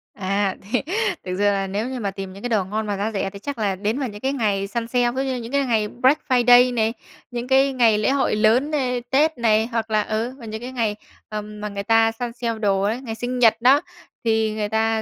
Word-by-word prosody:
À, 195 Hz, -1 st, -1 dB, 0.2 s
thì 250 Hz, -, +2 dB, 0.4 s
thực 180 Hz, -1 st, -3 dB
sự 205 Hz, -, 0 dB
là 200 Hz, -1 st, +2 dB
nếu 205 Hz, +5 st, -2 dB
như 260 Hz, -1 st, -4 dB
mà 200 Hz, -3 st, -2 dB
tìm 195 Hz, -1 st, -7 dB
những 195 Hz, -, -11 dB
cái 245 Hz, -, -2 dB
đồ 215 Hz, -4 st, +2 dB
ngon 215 Hz, +3 st, -3 dB
mà 205 Hz, -, -2 dB
giá 205 Hz, +3 st, -2 dB
rẻ 195 Hz, -2 st, -2 dB
thì 200 Hz, +1 st, -11 dB
chắc 280 Hz, +6 st, -5 dB
là 205 Hz, -3 st, 0 dB
đến 215 Hz, +7 st, -2 dB
vào 260 Hz, -4 st, -2 dB
những 205 Hz, 0 st, -10 dB
cái 270 Hz, +1 st, 0 dB
ngày 205 Hz, -6 st, 0 dB
săn 230 Hz, +2 st, -3 dB
sale, 245 Hz, 0 st, +1 dB
ví 265 Hz, +2 st, -2 dB
dụ -, -, -1 dB
như -, -, -2 dB
những 235 Hz, 0 st, -7 dB
cái 280 Hz, -1 st, +1 dB
ngày 220 Hz, -3 st, +1 dB
Black 260 Hz, +6 st, +2 dB
Friday 245 Hz, 0 st, +6 dB
này, 225 Hz, -1 st, +1 dB, 0.4 s
những 240 Hz, 0 st, -4 dB
cái 270 Hz, +1 st, +3 dB
ngày 230 Hz, -4 st, +4 dB
lễ 210 Hz, +4 st, +1 dB
hội 275 Hz, -5 st, +1 dB
lớn 230 Hz, +8 st, +3 dB
này, 250 Hz, -4 st, 0 dB
Tết 305 Hz, +4 st, +2 dB
này, 220 Hz, -1 st, +2 dB
hoặc 230 Hz, -2 st, -3 dB
là, 215 Hz, -1 st, +3 dB
ừ, 225 Hz, +4 st, -2 dB
và 230 Hz, -, -10 dB
những 220 Hz, 0 st, -6 dB
cái 250 Hz, +1 st, -6 dB
ngày, 225 Hz, -5 st, -1 dB, 0.3 s
ờm, 210 Hz, 0 st, -6 dB
mà 210 Hz, -, -3 dB
người 200 Hz, 0 st, -5 dB
ta 225 Hz, +1 st, +4 dB
săn 235 Hz, +1 st, -5 dB
sale 230 Hz, -2 st, -3 dB
đồ 200 Hz, -2 st, +1 dB
đấy, 240 Hz, +4 st, -3 dB
ngày 225 Hz, -4 st, -5 dB
sinh 245 Hz, +2 st, -3 dB
nhật 225 Hz, -1 st, +4 dB
đó, 265 Hz, +4 st, +5 dB, 0.4 s
thì 220 Hz, -1 st, +1 dB
người 210 Hz, -1 st, -2 dB
ta 220 Hz, 0 st, +1 dB
225 Hz, 265 wpm, -22 LUFS, 210-245 Hz, 0.4 s, Friday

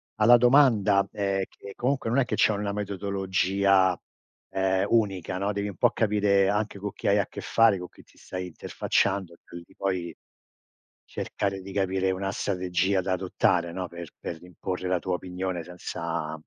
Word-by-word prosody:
alla 115 Hz, +3 st, +7 dB
domanda, 115 Hz, -6 st, +4 dB
ehm, 100 Hz, -2 st, -1 dB
che 100 Hz, -, -11 dB
comunque 130 Hz, -1 st, -1 dB
non 130 Hz, +4 st, +2 dB
è 130 Hz, -, +3 dB
che -, -, -2 dB
c'è 110 Hz, -, +4 dB
una 100 Hz, 0 st, -2 dB
metodologia, 95 Hz, -2 st, +1 dB, 0.5 s
ehm, 95 Hz, 0 st, +1 dB
unica, 95 Hz, -5 st, +1 dB
no, 100 Hz, +1 st, 0 dB
devi 100 Hz, 0 st, -2 dB
un 100 Hz, -, -8 dB
po' -, -, +4 dB
capire 100 Hz, -3 st, +2 dB
anche 105 Hz, -1 st, -1 dB
con 100 Hz, +1 st, -4 dB
chi -, -, -5 dB
hai 100 Hz, +1 st, +4 dB
a 100 Hz, -, 0 dB
che -, -, -8 dB
fare, 115 Hz, -4 st, +4 dB
con 90 Hz, -, -6 dB
chi -, -, -18 dB
ti -, -, -26 dB
stai 90 Hz, 0 st, -6 dB
interfacciando, 95 Hz, +1 st, -1 dB
quindi 85 Hz, 0 st, -12 dB
poi, 90 Hz, -4 st, -2 dB, 0.9 s
cercare 95 Hz, -1 st, -3 dB
di 95 Hz, 0 st, -9 dB
capire 95 Hz, -1 st, +1 dB
una 95 Hz, +1 st, -2 dB
strategia 95 Hz, 0 st, 0 dB
da 95 Hz, 0 st, -1 dB
adottare, 90 Hz, -1 st, +1 dB
no, 90 Hz, -1 st, -3 dB
per 85 Hz, -1 st, -9 dB
per 85 Hz, 0 st, -6 dB
imporre 90 Hz, +1 st, -5 dB
la 90 Hz, -1 st, +1 dB
tua 90 Hz, 0 st, -2 dB
opinione 90 Hz, -1 st, -4 dB
senza 85 Hz, -2 st, -5 dB
95 Hz, 170 wpm, -27 LUFS, 90-100 Hz, 0.9 s, alla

